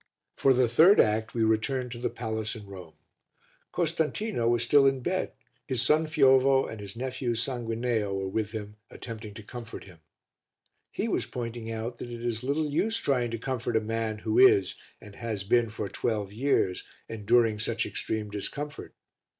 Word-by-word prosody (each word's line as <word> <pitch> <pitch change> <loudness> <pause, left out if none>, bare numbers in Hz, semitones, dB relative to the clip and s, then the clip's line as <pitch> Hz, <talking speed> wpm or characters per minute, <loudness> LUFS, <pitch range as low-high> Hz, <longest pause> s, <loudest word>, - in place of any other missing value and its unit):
For 135 - +3
the 125 -1 +4
third 160 - +6
act 110 +2 +2
we 115 - +2
returned 120 +3 0
to 120 - -6
the 120 - -1
palace 110 -2 -4
in 105 -2 -9
Rome. 95 -5 -11 0.8
Costantino 165 - 0
was 120 0 +2
still 135 +3 +5
in 135 -1 +1
bed, 185 +8 -1 0.3
his 130 -4 0
son 155 +4 +3
Fiovo 135 -3 +4
and 110 - -7
his 100 0 -8
nephew 125 -1 -2
Sanguineo 115 -3 -1
were 95 0 -2
with 105 +2 -2
him 105 -1 -7
attempting 110 -3 -8
to 110 - -9
comfort 115 +1 -8
him; 90 -4 -15 0.9
he - - -3
was - - -1
pointing 115 -2 -5
out 115 +2 -4
that 120 - -6
it 120 0 -6
is 115 -2 -1
little 145 +3 0
use 220 +9 +1
trying 125 - 0
to 115 - -3
comfort 120 -1 -3
a - - +4
man 110 0 -2
who 110 - 0
is, 390 +1 +6 0.3
and 105 -2 -13
has 110 -4 -4
been 115 +3 +2
for 105 -1 -4
twelve 105 0 -2
years, 115 -6 +1 0.2
enduring 115 0 +2
such 110 - 0
extreme 105 -2 -3
discomfort. 145 +8 -6
115 Hz, 175 wpm, -28 LUFS, 110-130 Hz, 0.9 s, third